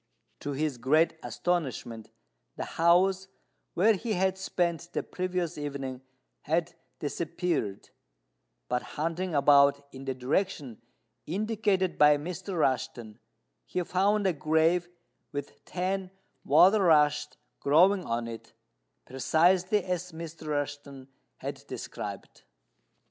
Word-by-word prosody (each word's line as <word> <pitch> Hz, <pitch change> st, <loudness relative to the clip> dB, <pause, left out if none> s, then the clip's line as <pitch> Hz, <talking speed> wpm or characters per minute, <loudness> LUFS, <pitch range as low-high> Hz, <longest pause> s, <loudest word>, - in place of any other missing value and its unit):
To 145 Hz, -, -4 dB
his 145 Hz, -3 st, -2 dB
great 155 Hz, +7 st, +3 dB
astonishment, 130 Hz, -10 st, -3 dB, 0.5 s
the -, -, -4 dB
house 185 Hz, +3 st, +3 dB, 0.5 s
where 215 Hz, +6 st, +5 dB
he 220 Hz, +2 st, -2 dB
had 190 Hz, 0 st, +1 dB
spent 175 Hz, -2 st, -2 dB
the -, -, -1 dB
previous 180 Hz, -3 st, -3 dB
evening 135 Hz, -3 st, -5 dB, 0.4 s
had 165 Hz, +2 st, -1 dB, 0.2 s
disappeared; 160 Hz, -, -3 dB, 0.8 s
but 125 Hz, 0 st, 0 dB, 0.2 s
hunting 165 Hz, +3 st, -2 dB
about 140 Hz, 0 st, +5 dB
in 135 Hz, 0 st, -9 dB
the 135 Hz, -1 st, -2 dB
direction 135 Hz, -, -2 dB, 0.5 s
indicated 200 Hz, 0 st, 0 dB
by 150 Hz, 0 st, +7 dB
Mr. 180 Hz, +4 st, -5 dB
Rushten, 120 Hz, -6 st, -1 dB, 0.5 s
he 180 Hz, -, -1 dB
found 200 Hz, +4 st, +1 dB
a 190 Hz, -, +3 dB
grave 160 Hz, +4 st, +2 dB, 0.4 s
with 145 Hz, 0 st, -7 dB
ten 185 Hz, +1 st, -2 dB, 0.3 s
water 200 Hz, +3 st, +6 dB
rushes 150 Hz, -4 st, +3 dB, 0.2 s
growing 180 Hz, +7 st, +4 dB
on 115 Hz, 0 st, -2 dB
it, 115 Hz, -1 st, -9 dB, 0.5 s
precisely 180 Hz, -, +2 dB
as 180 Hz, -1 st, -3 dB
Mr. 160 Hz, -1 st, -8 dB
Rushten 145 Hz, -2 st, -4 dB, 0.3 s
had -, -, -6 dB
described. -, -, -7 dB
165 Hz, 110 wpm, -29 LUFS, 140-185 Hz, 0.8 s, by